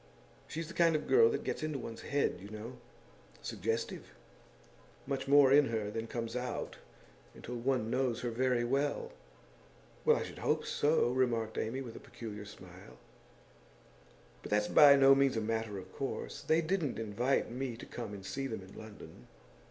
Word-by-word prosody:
She's 165 +1 -5
the 165 - -9
kind 165 -2 +4
of 155 - -2
girl 455 +2 +6
that 445 - -2
gets - - -3
into 155 -2 -2
one's 115 -3 -7
head, 140 -10 0
you 100 - -10
know 110 +4 -8 0.6
suggestive; 115 +3 -3 0.9
much 135 0 -3
more 140 -1 +6
in 145 0 +7
her 110 -2 -2
than 115 +1 -4
comes 115 0 -4
out 125 -1 -4 0.6
until - - -8
one 120 -2 0
knows 125 -2 0
her 120 - -2
very 125 0 +1
well.' 140 +4 -1 0.9
'Well, - - +5
I - - -2
should - - -9
hope - - 0
so,' 145 -4 +2
remarked 120 -4 0
Amy, 125 +5 -2
with 120 -4 -8
a - - -8
peculiar 105 -3 -8
smile. 105 - -13 1.4
'But - - -8
that's 105 0 +2
by 145 -2 +8
no 135 0 +7
means 135 -3 +3
a - - +2
matter 110 -1 -2
of 95 0 -10
course. 135 - -4
They 160 +1 +2
didn't 160 -5 -1
invite 115 +4 0
me 125 -1 -4
to - - -9
come 115 -4 -6
and 100 -2 -8
see 135 +5 -3
them 110 -6 -5
in 95 - -14
London. 110 -1 -12
125 Hz, 175 wpm, -33 LUFS, 110-140 Hz, 1.4 s, by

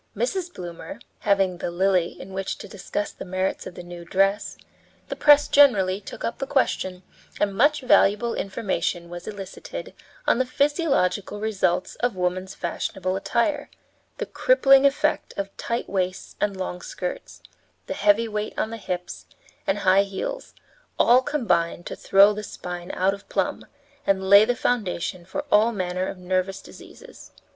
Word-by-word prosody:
Mrs. 380 -7 -1
Bloomer, 175 - -8 0.2
having 195 -3 +1
the - - -2
Lily 180 0 +1
in 190 - -10
which 195 0 -3
to - - -9
discuss 205 +1 -4
the - - -9
merits 185 +1 -2
of 180 - -10
the 180 - -8
new 175 0 -9
dress, 195 +3 +1 0.5
the - - -3
press 295 0 +6
generally 200 -9 +4
took - - -9
up - - -3
the 270 - -3
question, 190 -9 0 0.4
and 205 -1 +1
much 290 +7 +3
valuable 235 -2 +3
information 175 -3 -2
was 175 0 -8
elicited 215 - -7 0.3
on - - +3
the 260 - +2
physiological 275 - 0
results 195 -4 -1
of 245 -3 -1
woman's 185 +1 -2
fashionable 185 +1 -3
attire; 245 +9 0 0.5
the - - -3
crippling 275 - +5
effect 275 - -1
of 200 0 -4
tight 235 +1 -3
waists 185 -1 -3
and 200 -2 0
long 180 -1 -4
skirts, - - -6 0.4
the - - -4
heavy 210 +3 +3
weight 210 -1 -4
on 220 - -1
the 230 - -5
hips, 180 -4 -5 0.4
and 195 - +2
high 190 -1 +4
heels, 350 - -5 0.4
all 245 +2 +6
combined 175 - 0
to - - -5
throw 200 +2 +5
the 210 - -5
spine 180 -3 -7
out 190 +2 +2
of 200 - -11
plumb - - -2 0.4
and 190 -1 +1
lay 200 +2 +8
the 245 +2 0
foundation 190 -7 -1
for 285 +11 -5
all 215 +3 +5
manner 185 -3 -2
of - - -6
nervous 185 +1 -1
diseases. - - -14
195 Hz, 160 wpm, -24 LUFS, 185-235 Hz, 0.5 s, lay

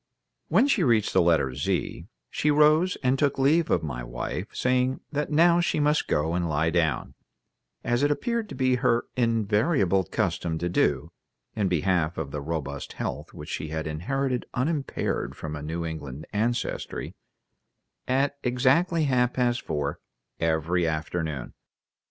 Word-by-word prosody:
When 275 - +4
she 240 -8 +2
reached 115 - +2
the 95 - +5
letter 80 -6 +2
Z, - - -2 0.2
she 150 - 0
rose 155 +5 +4
and 130 +1 +2
took 145 -2 +1
leave 150 +5 +3
of - - +2
my 60 -6 -4
wife, - - -4
saying 130 +1 +1
that 150 0 -1
now 170 +3 +5
she 175 -3 +1
must 150 +1 +2
go 80 +3 0
and 85 -1 0
lie 80 +2 +1
down, 80 -3 0 0.7
as 120 +1 +1
it 145 - +3
appeared 230 - -1
to - - -7
be 130 -1 +2
her 125 -2 +2
invariable 110 - +2
custom 80 0 -1
to 85 - -2
do 75 -6 +1 0.4
(in 105 -3 +1
behalf 90 -1 +1
of 75 -4 -4
the 75 - -4
robust 70 -2 -4
health - - -5
which - - -9
she 80 - -3
had 80 +1 -4
inherited 125 - -2
unimpaired 140 +2 -1
from 75 -1 -5
a 75 - -6
New 80 +3 -3
England 75 -3 -6
ancestry), 115 +4 -2 0.9
at 140 +2 +1
exactly 135 +7 +2
half 125 -3 +2
past 125 -1 +1
four 75 -2 -3 0.4
every 80 +2 +1
afternoon. 80 -3 -3
110 Hz, 150 wpm, -26 LUFS, -, 0.9 s, the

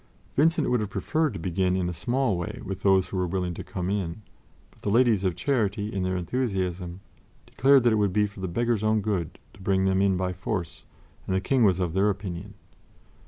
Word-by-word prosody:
Vincent 165 +4 +3
would 125 - +3
have 105 -2 -3
preferred 155 +4 0
to - - -5
begin 90 +2 0
in 90 -2 0
a 90 - -2
small 120 +6 0
way 85 -1 -4
with 95 -1 -5
those 95 -2 +3
who 95 - -4
were 90 -1 0
willing 90 0 -2
to - - -7
come 90 -1 -4
in; 95 0 -2 0.5
but - - -23
the - - -2
Ladies 115 -2 +4
of 90 -3 0
Charity, 105 -6 -1
in 95 - -1
their 95 0 0
enthusiasm, 95 -4 -2 0.4
declared 135 0 +4
that 120 -2 +4
it - - +2
would 100 -2 +2
be 105 +2 +2
for 105 0 -9
the 95 - -3
beggars' 115 +4 0
own 110 0 +2
good 95 -6 -2 0.2
to 95 - -16
bring 95 0 +1
them 95 0 +2
in 95 -2 +3
by 90 0 -1
force, 90 -2 -4 0.4
and 95 - 0
the - - +2
King 125 +6 +2
was 95 -4 +4
of 90 -3 -1
their 100 +3 +3
opinion. 100 -1 -5
95 Hz, 220 wpm, -26 LUFS, 90-110 Hz, 0.5 s, Ladies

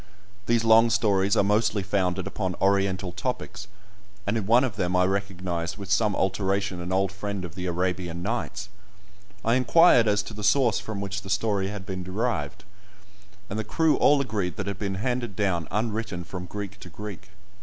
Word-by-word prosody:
These 115 -1 +3
long 115 +1 +6
stories 100 -3 +2
are - - +5
mostly 105 0 +2
founded 95 -2 0
upon 95 -3 -3
Oriental 95 -1 +1
topics, 100 +1 -4 0.6
and 100 - 0
in 105 -4 -2
one 120 +3 +5
of 125 -6 -2
them 90 -3 -1
I 90 0 +4
recognised 90 -3 -2
with 100 -2 -7
some 105 0 +3
alteration 95 -1 0
an 90 +1 -5
old 95 0 +1
friend 100 -1 -4
of 80 - -9
the 90 -1 -4
"Arabian 90 -1 -2
Nights." 105 -1 -3 0.8
I 115 - +3
inquired 125 -1 +5
as 105 0 +2
to 110 - -8
the 105 0 -7
source 120 +3 +3
from 105 -2 -5
which 100 0 -3
the 95 - -10
story 100 0 +1
had 100 -1 -6
been 95 -1 -4
derived, 105 +7 -2 0.8
and 105 0 -4
the - - -1
crew 160 +7 +2
all 145 0 +5
agreed 105 -9 -2
that 100 -3 -4
it - - -2
had 100 - -8
been 100 -2 -2
handed 120 0 -2
down 90 -6 0
unwritten 105 -3 -2
from 90 0 -7
Greek 100 +1 -6
to - - -10
Greek. 105 -3 -8
100 Hz, 185 wpm, -26 LUFS, 95-110 Hz, 0.8 s, long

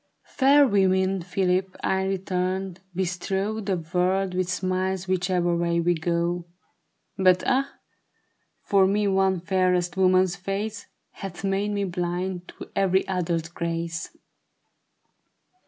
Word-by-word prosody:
''Fair 280 +1 +5
women, 190 -2 +2
Philip," 185 +1 0
I 190 0 +1
returned, 190 -1 -2 0.2
"bestrow 190 +3 -2
The 195 -2 0
world 180 +3 0
with 180 -1 -1
smiles 185 0 -1
whichever 180 -1 +1
way 170 0 +1
we 175 +1 +2
go; 170 +1 -1 0.7
But 185 -1 +4
ah, 275 +2 +1 0.9
for 195 -2 +4
me 205 +1 +1
one 190 -2 +2
fairest 185 -1 +1
woman's 185 -1 +3
face 200 +3 -4 0.2
Hath 195 -1 -8
made 195 +1 0
me 205 -1 -1
blind 180 0 -3
to - - -11
ever} 190 -1 +3
other's 170 -3 -1
grace." 165 0 -3
185 Hz, 115 wpm, -25 LUFS, 175-195 Hz, 0.9 s, Fair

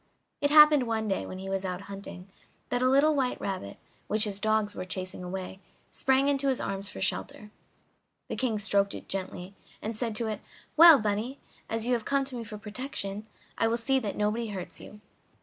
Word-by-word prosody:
It 285 - +3
happened 300 -3 +7
one 220 -1 -1
day, 195 - -1
when 185 - -7
he 190 +1 -7
was 195 0 -1
out 180 0 -3
hunting, 195 -2 -9 0.4
that 245 - 0
a 255 - +4
little 290 +3 +4
white 260 -3 0
rabbit, 185 - -4 0.3
which 215 0 +2
his 205 -3 -2
dogs 215 -1 +1
were - - -5
chasing, 185 0 -5 0.7
sprang 270 0 +2
into 280 -1 +1
his 265 -2 +1
arms 195 +1 -4
for - - -9
shelter. 210 +2 -3 0.8
The - - -4
King 240 -4 0
stroked 200 -1 +1
it - - -9
gently, 190 0 -5 0.3
and 220 +1 -4
said 225 -1 -2
to 230 - +2
it: 215 -1 -4 0.3
"Well, 330 -2 +10
bunny, 215 +5 -2 0.3
as 225 0 -1
you 250 - +2
have 235 -2 0
come 275 -1 +1
to 265 -1 -9
me 235 - -4
for 210 -1 -8
protection 210 -2 -5 0.3
I 225 - +3
will 230 +1 +1
see 265 +3 +2
that 210 -5 -4
nobody 215 +3 0
hurts 190 -4 -7
you." 210 - -12
215 Hz, 200 wpm, -28 LUFS, 200-255 Hz, 0.8 s, Well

